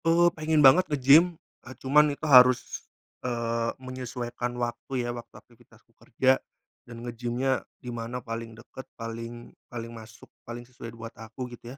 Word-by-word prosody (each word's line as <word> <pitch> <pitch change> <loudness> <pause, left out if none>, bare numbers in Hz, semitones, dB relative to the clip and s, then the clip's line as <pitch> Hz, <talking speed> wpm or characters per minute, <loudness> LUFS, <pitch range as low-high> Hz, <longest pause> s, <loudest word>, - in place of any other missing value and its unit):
Eee, 170 +1 +5
pengen 155 -1 +2
banget 175 +8 +7
ngegym, 150 +5 +5 0.2
eee, 130 - -11
cuman 150 +3 +4
itu 145 +2 -5
harus, 125 -3 +5 0.3
eee, 115 -1 -1
menyesuaikan 125 -1 -5
waktu 120 +1 -3
ya, 120 - -2
waktu 120 -1 -9
aktivitasku - - -22
kerja 130 0 +1 0.5
dan 120 0 -9
ngegymnya 120 +2 -1 0.2
dimana 120 0 -5
paling 115 -2 -6
deket, 125 +3 -12
paling 115 +1 -7 0.2
paling 115 -1 -7
masuk, 110 0 -12 0.2
paling 120 +1 -8
sesuai 120 -2 -10
buat 115 0 -8
aku 115 +3 -8
gitu 120 +2 -10
120 Hz, 145 wpm, -27 LUFS, 115-130 Hz, 0.5 s, banget